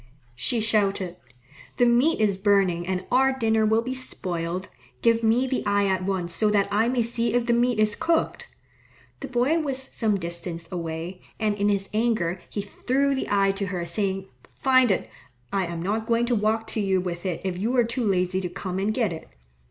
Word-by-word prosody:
She 225 - -1
shouted, 200 -5 0 0.6
"The 245 - +4
meat 245 +7 +3
is 210 -3 +2
burning 190 -3 +2
and 185 0 -2
our 265 +1 +3
dinner 220 -2 +2
will 220 +1 +2
be 255 +2 -3
spoiled. 180 -7 -3 0.4
Give 230 0 +4
me 230 +3 +3
the 260 0 -1
eye 205 0 +2
at 190 -1 0
once, 185 -3 -2
so 215 +5 +2
that 205 -1 +2
I 220 +3 +2
may 245 -2 +1
see 235 0 0
if 245 -1 +2
the 235 - +2
meat 240 0 +2
is 215 -1 +2
cooked." 330 0 0 0.7
The 275 - -5
boy 260 +6 +2
was 280 -4 -1
some 220 -5 0
distance 170 -1 -5
away, 170 +1 -5 0.2
and 215 -1 +1
in 205 0 +1
his 195 -1 0
anger 210 -6 0
he 205 - -3
threw 265 +7 0
the 265 - -2
eye 195 -1 +3
to 195 0 -3
her, 180 -2 -3
saying, 190 +2 -1 0.2
"Find 260 -2 +3
it. 190 - 0 0.5
I 195 -3 +1
am 170 -1 -5
not 220 +4 -1
going 235 0 +2
to 240 0 +1
walk 220 +1 +1
to - - -3
you 190 -2 +2
with 175 -1 -4
it 180 -4 -2
if 185 -2 -3
you 230 +6 0
are 240 - +6
too 235 +2 -2
lazy 185 -2 +1
to 180 - -3
come 185 +1 -4
and 200 +2 +1
get 215 -5 0
it." 160 - -9
205 Hz, 205 wpm, -25 LUFS, 185-235 Hz, 0.7 s, are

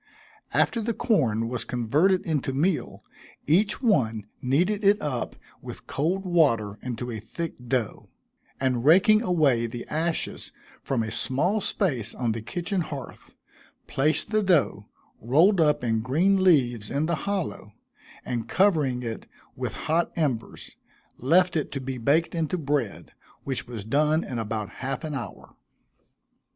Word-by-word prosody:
After 230 - +2
the 225 0 -2
corn 115 - +1
was 125 0 -3
converted 150 - +1
into 145 -5 -1
meal, 160 +6 -1 0.4
each 200 - +2
one 115 - +2 0.2
kneaded 180 +11 +1
it 200 +1 +5
up 145 - -3 0.3
with - - -9
cold 180 +7 -1
water 115 - +2
into 120 0 -5
a 110 - -5
thick 165 - -5
dough, 120 -4 -2 0.5
and 125 -3 0
raking 195 +8 +6
away 150 - +2
the 120 +1 -7
ashes 165 +2 -2 0.3
from 125 -4 -1
a 110 - -4
small 140 - +1
space 130 - -1
on 120 -3 -1
the 110 0 -3
kitchen 175 - -2
hearth, 140 -6 -8 0.5
placed 155 +9 0
the 215 0 +3
dough, 180 -7 +1 0.3
rolled 165 - +4
up 150 -4 +2
in 115 -2 +1
green 180 - +2
leaves, 120 - +3
in 145 +3 0
the 170 - -1 0.2
hollow, 180 - -3 0.5
and 120 -2 -3
covering 150 -11 +2
it 115 -2 -5 0.3
with - - -4
hot 165 +3 +1
embers, 135 -9 -3 0.4
left 175 +7 +3
it 155 - -1
to 140 - -2
be 130 -1 -5
baked 145 +8 +2
into 165 +1 -1
bread, 140 - -2 0.3
which 135 -2 -4
was 115 -5 -7
done 150 +6 +2
in 125 -3 -4
about 110 -2 -3
half 135 0 -3
an 155 -1 -4
hour. 120 -8 -7
140 Hz, 145 wpm, -26 LUFS, 120-175 Hz, 0.5 s, raking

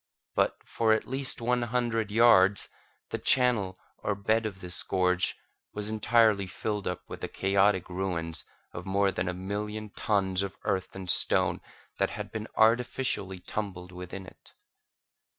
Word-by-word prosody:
But, - - +1
for 110 -1 +2
at 110 - 0
least 135 -1 -1
one 125 +1 +1
hundred 120 -2 -1
yards, 105 -3 +5 0.4
the - - -2
channel 115 -8 +3 0.2
or 105 - -1
bed 110 +3 +1
of 100 -3 -8
this 90 -2 0
gorge 90 -1 +1 0.4
was 105 +1 -3
entirely 110 -2 +3
filled 105 +2 -4
up 90 0 -3
with - - -8
the - - -3
chaotic 95 -1 +1
ruins 85 -3 -3 0.3
of 90 +2 -7
more 100 +1 +2
than 90 - -3
a - - -2
million 105 +3 -5
tons 95 -3 0
of 100 -1 -4
earth 95 -1 -2
and 95 -1 -7
stone - - +5 0.4
that - - +2
had - - -7
been 110 0 -5
artificially 115 -4 +1
tumbled 90 -1 -6
within 90 +1 -8
it. - - -17
100 Hz, 150 wpm, -28 LUFS, 95-110 Hz, 0.4 s, yards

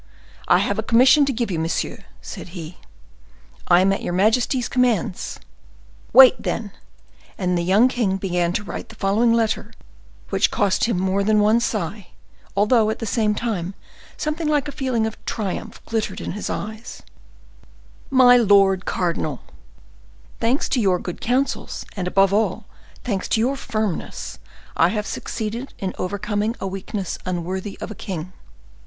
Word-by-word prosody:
"I - - +6
have - - 0
a - - +2
commission 260 +5 +5
to 275 - 0
give 235 -4 -2
you, 165 - -1
monsieur," 165 +1 -2 0.2
said 180 +1 -8
he. 165 +1 -8 0.9
"I 175 0 +6
am 195 +1 +3
at - - -3
your 175 - -3
majesty's 225 +6 +2
commands." 235 -8 0 0.7
"Wait, 260 -1 +8
then." 210 -3 -3 0.7
And 180 -3 0
the 175 - +1
young 195 +8 +4
king 230 -7 0
began 180 -3 0
to 205 - -2
write - - -7
the 225 - -12
following 215 +3 +2
letter, 225 -1 0 0.6
which - - +3
cost 200 -2 +1
him 230 -5 0
more 190 +1 +1
than 215 +1 +3
one 215 +3 +4
sigh, 205 -4 -3 0.5
although, 215 +1 +4
at 220 - -2
the 225 - -5
same 215 -1 +1
time, 200 -5 -3 0.4
something 305 +1 -2
like 295 -1 +1
a - - -4
feeling 255 -5 -1
of 220 - -6
triumph 215 +1 -4
glittered 220 -4 -2
in - - -4
his 210 - -5
eyes: 220 +3 -6 1.1
"MY 255 -2 +7
LORD 195 -4 +4
CARDINAL,—Thanks 225 - -4
to 250 - +1
your 190 -4 +3
good 175 0 -7
counsels, 260 +4 -1
and, 185 -3 -3
above 195 +1 +3
all, 210 0 0 0.4
thanks 200 -6 -2
to - - +1
your 255 +5 +1
firmness, 215 -9 -4 0.4
I 165 - +5
have 210 +1 -2
succeeded 230 +5 -5
in 190 -1 -3
overcoming 205 +4 -2
a - - -4
weakness 195 0 -4
unworthy 185 +2 -4
of - - -6
a - - -4
king. 185 -3 -6
210 Hz, 155 wpm, -22 LUFS, 190-235 Hz, 1.1 s, Wait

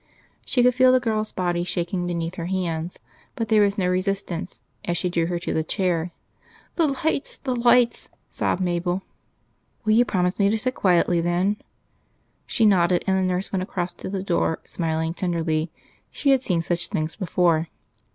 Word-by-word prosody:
She 245 - +2
could 250 0 +5
feel 255 +1 +5
the 255 - +5
girl's 215 -3 -1
body 175 -1 -1
shaking 175 +1 -2
beneath 170 -1 -2
her 170 -2 -5
hands, 175 -2 -2 0.4
but 225 -2 -3
there 215 -1 +5
was 200 0 +2
no 185 -3 +1
resistance 185 -1 -2 0.2
as 175 0 -1
she 180 +1 -1
drew 165 -1 +1
her 175 0 -1
to 170 - -3
the 160 - 0
chair. 175 0 -1 0.7
"The 330 -3 +3
lights! 300 +1 -1
the 255 -2 -2
lights!" 240 0 +3 0.2
sobbed 190 - -1
Mabel. 175 +1 -1 0.8
"Will 215 - +4
you 235 +2 +6
promise 180 -4 0
me 200 0 +4
to 220 - +1
sit 255 +4 -1
quietly, 175 -4 +2
then?" 180 +4 +1 0.9
She 225 - +2
nodded; 180 -3 +4
and 190 - +2
the 190 - +2
nurse 180 +2 -2
went 190 - +1
across 180 -1 -3
to - - -7
the 190 -1 -3
door, 170 -3 +1
smiling 160 -1 -1
tenderly; 165 -3 -1 0.4
she 280 - +1
had 265 -2 +4
seen 175 -9 0
such 175 +1 -1
things 155 +1 -3
before. 170 -4 +1
180 Hz, 180 wpm, -24 LUFS, 170-210 Hz, 0.9 s, you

